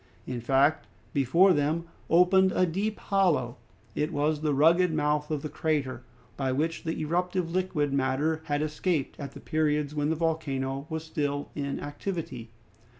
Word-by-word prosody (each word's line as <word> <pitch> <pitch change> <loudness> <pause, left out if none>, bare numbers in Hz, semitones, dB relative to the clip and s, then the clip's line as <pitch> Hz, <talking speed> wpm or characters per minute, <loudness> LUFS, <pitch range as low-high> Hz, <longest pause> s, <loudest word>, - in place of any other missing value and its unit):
In 125 -2 -4
fact, 135 +5 +2 0.3
before 165 +8 +5
them 155 +2 0 0.3
opened 185 +2 +5
a 185 - +3
deep 200 +5 -2
hollow. 175 -11 +1 0.4
It 150 +7 -1
was 150 0 0
the 155 -1 +1
rugged 165 +5 +4
mouth 150 -1 0
of 150 -3 -2
the - - -2
crater, 145 -4 -1 0.4
by 135 -2 0
which 160 +6 -1
the 160 - -2
eruptive 180 +2 -1
liquid 170 -6 0
matter 140 +4 0
had 145 -1 0
escaped 155 -1 -1
at 140 -2 -6
the - - -10
periods 150 -2 0
when 150 0 0
the 160 - +1
volcano 140 -4 -2
was 160 -1 -3
still 145 -2 -3
in 140 -1 -3
activity. 145 - -5
150 Hz, 155 wpm, -28 LUFS, 145-165 Hz, 0.4 s, before